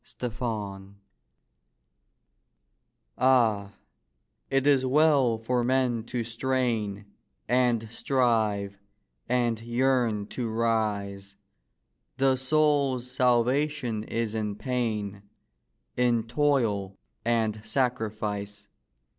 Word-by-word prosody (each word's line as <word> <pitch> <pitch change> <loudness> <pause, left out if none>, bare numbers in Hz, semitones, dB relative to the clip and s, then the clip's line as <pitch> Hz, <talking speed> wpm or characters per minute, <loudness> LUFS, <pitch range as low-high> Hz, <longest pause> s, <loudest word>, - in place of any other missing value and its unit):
NEPENTHE 105 -5 -4 2.2
Ah, 115 -6 +3 0.8
it 135 0 +1
is 140 -2 +4
well 135 -3 +3
for 120 +2 -1
men 125 -2 +1
to 120 0 -3
strain 115 -4 -1 0.4
And 120 -2 +2
strive 110 -6 0 0.5
and 120 -2 +1
yearn 120 -3 +1
to 120 -3 -3
rise; 105 -3 -1 0.8
The 135 0 +3
soul's 135 -2 +1
salvation 125 -1 +1
is 115 -2 -2
in 105 -2 -2
pain, 105 -5 -2 0.7
In 120 -2 +2
toil 115 -7 0 0.3
and 110 -2 0
sacrifice. 110 -4 -2
115 Hz, 80 wpm, -27 LUFS, 105-130 Hz, 2.2 s, is